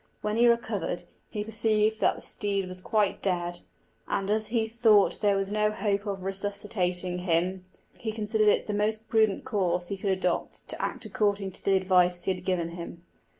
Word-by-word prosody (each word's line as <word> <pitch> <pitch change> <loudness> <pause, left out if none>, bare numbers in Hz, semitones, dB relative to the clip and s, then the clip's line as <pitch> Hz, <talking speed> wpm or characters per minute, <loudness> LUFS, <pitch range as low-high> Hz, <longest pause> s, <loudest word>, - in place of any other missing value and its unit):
When 210 0 -1
he 240 +1 +5
recovered, 215 -7 0 0.3
he 210 - -3
perceived 220 0 +1
that - - +3
the - - -10
steed 200 -2 0
was 185 0 -6
quite 210 0 +1
dead; 175 -2 -1 0.5
and, 195 +1 -1
as 215 0 +1
he 225 -1 0
thought 220 -3 +4
there 205 -2 +3
was 195 0 -2
no 210 0 +2
hope 210 -1 -1
of 195 -2 -3
resuscitating 190 -2 -2
him, 180 +1 0 0.4
he 220 - -3
considered 215 0 +1
it 210 - +4
the 210 - -3
most 215 +2 0
prudent 220 -3 +2
course 180 -3 0
he 200 - -3
could 195 +1 -2
adopt 185 -2 -1
to - - -5
act 250 -2 -3
according 205 -2 0
to - - -9
the 195 - +3
advice 180 -2 +3
he 190 - +1
had 180 -1 -9
given 180 -3 0
him. 170 0 -8
200 Hz, 190 wpm, -28 LUFS, 185-215 Hz, 0.5 s, he